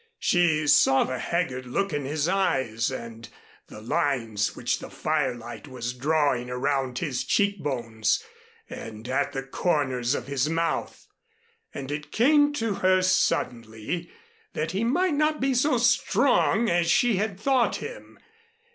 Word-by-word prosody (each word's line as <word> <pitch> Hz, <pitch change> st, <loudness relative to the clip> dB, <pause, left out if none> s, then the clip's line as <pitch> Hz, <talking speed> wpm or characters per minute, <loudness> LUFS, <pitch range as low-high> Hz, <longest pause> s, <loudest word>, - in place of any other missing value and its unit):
She 160 Hz, -4 st, +2 dB
saw 135 Hz, -2 st, +5 dB
the 130 Hz, 0 st, -4 dB
haggard 130 Hz, -7 st, -2 dB
look 195 Hz, +8 st, -1 dB
in 145 Hz, -2 st, -2 dB
his 150 Hz, +2 st, -1 dB
eyes 135 Hz, -, 0 dB
and 115 Hz, -3 st, -8 dB, 0.4 s
the 105 Hz, -, -11 dB
lines 115 Hz, -4 st, -1 dB
which -, -, -1 dB
the -, -, -9 dB
firelight 120 Hz, +3 st, -3 dB
was 125 Hz, -2 st, -5 dB
drawing 135 Hz, -2 st, 0 dB
around 130 Hz, 0 st, -1 dB
his 140 Hz, -6 st, -2 dB
cheek 200 Hz, -2 st, +1 dB
bones, 115 Hz, -6 st, -1 dB, 0.4 s
and 110 Hz, +1 st, -8 dB
at 135 Hz, +2 st, -1 dB
the 135 Hz, -, -3 dB
corners 135 Hz, -3 st, 0 dB
of 120 Hz, -, -4 dB
his 140 Hz, +1 st, -1 dB
mouth; 165 Hz, +1 st, -2 dB, 0.7 s
and 140 Hz, 0 st, -6 dB
it 150 Hz, 0 st, -5 dB
came 290 Hz, +5 st, +4 dB
to 225 Hz, -6 st, -1 dB
her 185 Hz, 0 st, +4 dB
suddenly 120 Hz, -1 st, -1 dB, 0.4 s
that 155 Hz, +1 st, -2 dB
he 195 Hz, +5 st, -1 dB
might 335 Hz, +9 st, +1 dB
not 305 Hz, +1 st, +1 dB
be 270 Hz, 0 st, +1 dB
so 255 Hz, +1 st, +2 dB
strong 235 Hz, -1 st, +2 dB
as 170 Hz, -2 st, +1 dB
she 235 Hz, +2 st, +3 dB
had 200 Hz, -1 st, -2 dB
thought 255 Hz, +1 st, +2 dB
him. -, -, -8 dB
145 Hz, 145 wpm, -26 LUFS, 125-195 Hz, 0.7 s, saw